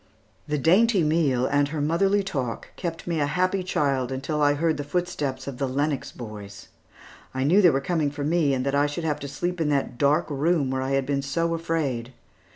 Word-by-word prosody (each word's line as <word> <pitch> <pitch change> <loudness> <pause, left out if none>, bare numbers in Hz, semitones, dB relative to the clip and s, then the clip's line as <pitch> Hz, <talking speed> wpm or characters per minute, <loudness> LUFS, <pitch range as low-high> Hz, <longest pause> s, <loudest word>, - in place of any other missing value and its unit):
The 150 - 0
dainty 190 - +4
meal 150 -5 +2
and 145 +1 +2
her 155 +1 -4
motherly 195 +7 +2
talk 130 -11 -4
kept 165 -3 -5
me 170 -2 -1
a 145 - +1
happy 185 +5 +1
child 135 -8 0
until 140 +3 -2
I 145 0 +4
heard 160 +1 +1
the 145 - -3
footsteps 145 -5 -2
of 135 -3 -6
the 135 - 0
Lennox 140 +1 -1
boys. 105 -5 -9 0.7
I 130 - 0
knew 175 +9 +5
they 180 - +7
were 135 -3 +1
coming 155 -1 0
for 145 0 -5
me, 150 -2 +2
and 130 0 -2
that 140 - 0
I 145 +1 +3
should 145 +3 -4
have 155 -2 -1
to 140 - -6
sleep 175 +4 -3
in 155 - +1
that 140 -4 -1
dark 145 +1 +3
room 145 -1 +1
where 130 0 -1
I 135 +1 -1
had 135 -1 +1
been 140 0 0
so 165 +5 -1
afraid. 145 -8 -2
145 Hz, 215 wpm, -25 LUFS, 135-165 Hz, 0.7 s, they